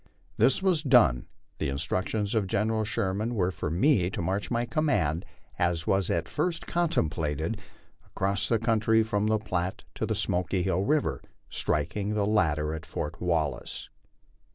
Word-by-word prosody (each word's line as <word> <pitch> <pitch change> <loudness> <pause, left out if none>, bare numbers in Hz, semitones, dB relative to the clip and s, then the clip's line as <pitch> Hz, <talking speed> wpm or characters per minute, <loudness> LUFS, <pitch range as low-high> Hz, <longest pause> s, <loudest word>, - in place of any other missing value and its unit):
This 135 +8 +3
was 180 -5 +3
done; 120 - +4 0.3
the - - 0
instructions 95 +8 -1
of 110 -4 +1
General 110 +3 +1
Sherman 110 +1 -1
were 95 -3 +1
for 90 - -4
me 90 - +3
to - - -5
march 95 +4 -1
my 120 0 0
command, 105 - 0 0.3
as 85 -2 +1
was 95 -1 +2
at - - 0
first 170 -2 -2
contemplated, 85 - -1 0.5
across 100 0 -1
the 115 - +3
country 110 0 +3
from 105 -1 0
the 110 0 +3
Platte 90 -4 -3
to - - -2
the - - 0
Smoky 90 +1 0
Hill 95 +1 0
river, 120 - +1 0.3
striking 105 +1 -1
the 105 -1 +1
latter 80 -7 +1
at 80 0 -5
Fort 75 0 -5
Wallace. 80 -7 -2
100 Hz, 155 wpm, -28 LUFS, 85-110 Hz, 0.5 s, done